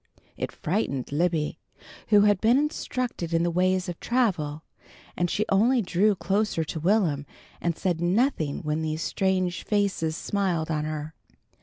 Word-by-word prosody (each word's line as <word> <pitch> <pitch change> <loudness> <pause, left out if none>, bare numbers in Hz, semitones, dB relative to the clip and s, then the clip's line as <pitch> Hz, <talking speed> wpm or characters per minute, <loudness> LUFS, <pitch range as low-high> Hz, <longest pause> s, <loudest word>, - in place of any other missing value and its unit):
It - - -4
frightened 150 - -2
Libby, 160 0 0 0.5
who 210 -2 +6
had 205 -2 +3
been 230 +3 +5
instructed 255 - -2
in 165 - +2
the 175 - +1
ways 185 +1 +1
of 175 -2 -5
travel, 170 -12 0 0.5
and 175 0 0
she 215 - 0
only 230 +5 +3
drew 195 +3 +2
closer 195 -2 0
to 160 +1 -5
Will'm 170 -5 +2 0.4
and 170 -1 -1
said 175 -3 -1
nothing 175 - +1
when 150 +1 -1
these 155 0 -2
strange 185 -2 0
faces 195 -6 0
smiled 180 -6 -1
on 150 -1 -1
her. 155 0 -4
180 Hz, 150 wpm, -26 LUFS, 160-205 Hz, 0.5 s, who